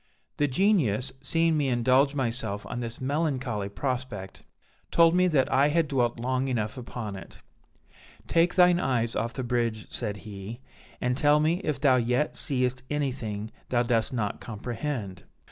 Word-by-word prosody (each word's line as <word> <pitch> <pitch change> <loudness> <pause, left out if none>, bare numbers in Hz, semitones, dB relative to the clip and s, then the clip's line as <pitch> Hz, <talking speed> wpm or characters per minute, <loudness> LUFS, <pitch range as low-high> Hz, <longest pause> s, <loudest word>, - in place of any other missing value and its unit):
"The 145 - +2
Genius, 135 - +2
seeing 165 -1 +2
me 140 -2 +1
indulge 130 +4 +3
myself 115 -6 -2
on 120 - -5
this 115 -1 -5
melancholy 130 -7 -1
prospect, 125 -5 -4 0.5
told 165 0 +5
me 180 +1 +4
that 145 -7 +2
I 135 +2 +5
had 160 +1 +2
dwelt 120 -4 0
long 130 +2 0
enough 110 -5 -1
upon 120 -4 -6
it: 95 -3 -11 0.8
'Take 170 +1 +2
thine 180 -1 +6
eyes 120 -7 0
off 115 +1 -2
the 130 - -3
bridge,' 115 -3 -1
said 105 -4 -3
he, 105 +3 -7 0.4
'and 125 0 0
tell 145 +2 +4
me 160 +4 +2
if 150 -6 -1
thou 135 -2 +4
yet 125 +4 0
seest 125 -2 0
anything 125 -7 -3 0.2
thou 120 -1 +2
dost 115 -2 +1
not 110 -5 -2
comprehend.' 115 - -5
125 Hz, 155 wpm, -27 LUFS, 115-145 Hz, 0.8 s, thine